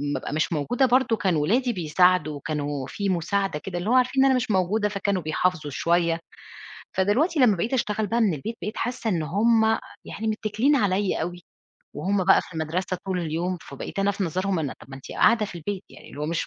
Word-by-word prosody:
بابقى - - -4
مش 155 +2 0
موجودة 235 - +1
برضه 255 -2 +3
كان 190 -5 +1
ولادي 235 - +1
بيساعدوا، 170 -3 +2
كانوا 145 -3 -3
في 200 -1 -3
مساعدة 185 -1 0
كده 180 +1 -6
اللي 195 +6 -3
هو - - +3
عارفين 255 +1 +3
إن - - +5
أنا 265 - +4
مش 250 -3 -1
موجودة 205 +3 +1
فكانوا 200 -2 -1
بيحافظوا 155 -1 -1
شوية، 170 +2 +1 0.8
فدلوقتي 260 - +2
لمّا 220 -6 +5
بقيت 215 +9 -2
أشتغل 215 -4 0
بقى 230 +4 0
من 205 -8 +3
البيت 225 +11 -5
بقيت 210 - -4
حاسّة 245 -2 -2
إن 170 -5 0
هم 220 +8 +3 0.4
يعني 220 - -6
مِتّكلين 220 +6 +1
عليّا 200 - +1
أوي، 175 +2 -5 0.5
وهم 195 -1 0
بقى 190 - +6
في 180 - -14
المدرسة 175 +4 -2
طول 185 -1 -1
اليوم، 170 +2 -2
فبقيت 140 +7 -8
أنا 195 +1 +2
في 200 -1 -2
نظرهم 185 +2 -1
أنا 145 -4 -3
طَب - - -15
ما 135 - -7
أنتِ 135 - -10
قاعدة 220 -1 +3
في - - -10
البيت، 185 +4 -4
يعني - - -14
اللي 145 - -9
هو 150 - -1
مش 165 +1 -2
190 Hz, 210 wpm, -25 LUFS, 165-220 Hz, 0.8 s, بقى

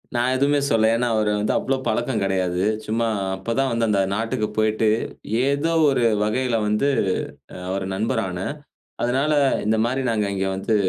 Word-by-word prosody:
நான் 120 +2 +2
எதுவுமே 140 +2 +2
சொல்லல. 110 -1 +3
ஏன்னா, 120 +1 0
அவரு 105 -1 +1
வந்து 105 +1 0
அவ்வளோ 135 0 0
பழக்கம் 115 0 0
கிடையாது. 95 -2 0 0.2
சும்மா 115 +2 0 0.3
அப்பதான் 115 +8 -1
வந்து 115 -1 +1
அந்த 100 -2 +2
நாட்டுக்கு 115 +1 -1
போயிட்டு 110 0 +2 0.6
ஏதோ 145 +4 +1 0.2
ஒரு 130 -3 +1 0.2
வகையில 120 +3 0
வந்து 105 +7 +1 0.8
அவர் 95 0 -2
நண்பர் 110 +4 0
ஆன. 90 0 -5 0.6
அதனால 135 +5 +1 0.3
இந்த 110 +1 +2
மாரி 130 +3 -1
நாங்க 105 -2 0
இங்க 95 0 -1
வந்து 95 +3 0
115 Hz, 155 wpm, -22 LUFS, 105-130 Hz, 0.8 s, சொல்லல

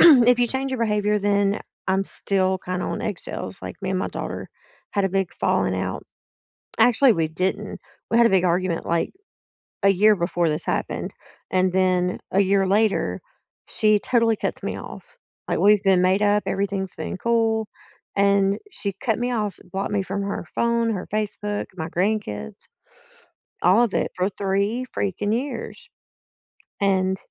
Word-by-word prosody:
if 245 -7 +8
you 240 - +3
change 265 +2 -2
your 260 - -2
behavior, 210 -1 +1
then 200 0 +1 0.3
I'm 190 +1 +2
still 190 -1 0
kinda 180 0 -3
on - - -3
eggshells, 195 -1 -5
like, - - -6
me 190 - -2
and 185 - 0
my - - -1
daughter - - -5 0.4
had 200 -2 +1
a - - +2
big 195 -2 -1
falling - - +1
out. - - -3 0.8
Actually, 245 0 +5
we 160 -3 0
didn't. 185 +4 -2 0.3
We 230 - +2
had 235 - +6
a - - +5
big 190 -1 +3
argument, 175 0 0
like, 170 0 0 0.7
a 195 - +6
year 210 +2 +5
before 170 -2 0
this 150 - -3
happened. - - -2 0.4
And 185 -1 +2
then 185 -1 +1
a 195 - +2
year 195 0 +2
later, 210 +1 +1 0.5
she 215 -1 +3
totally 230 -2 +2
cuts - - -3
me - - -3
off. - - -11 0.3
Like, - - 0
we've 210 0 +5
been 190 -2 +4
made 185 +2 +3
up, 205 0 +3
everything's 195 -1 -2
been - - -5
cool, 225 0 +1 0.5
and 200 0 +3
she 200 - -4
cut 225 +1 -1
me 245 +1 -1
off, 210 -5 -2
blocked 195 +2 -2
me 200 -1 0
from 195 +1 -3
her 200 -3 -4
phone, 235 -1 +1
her 190 -4 -4
Facebook, 210 -1 -2
my 160 -2 -4
grandkids, 175 - -2 1.0
all 190 +7 +5
of 235 -5 0
it - - 0
for 185 +1 0
3 200 +5 -1
freaking 205 +2 -1
years. 250 -1 -5 0.9
And 190 -1 +2
200 Hz, 165 wpm, -23 LUFS, 185-215 Hz, 1.0 s, if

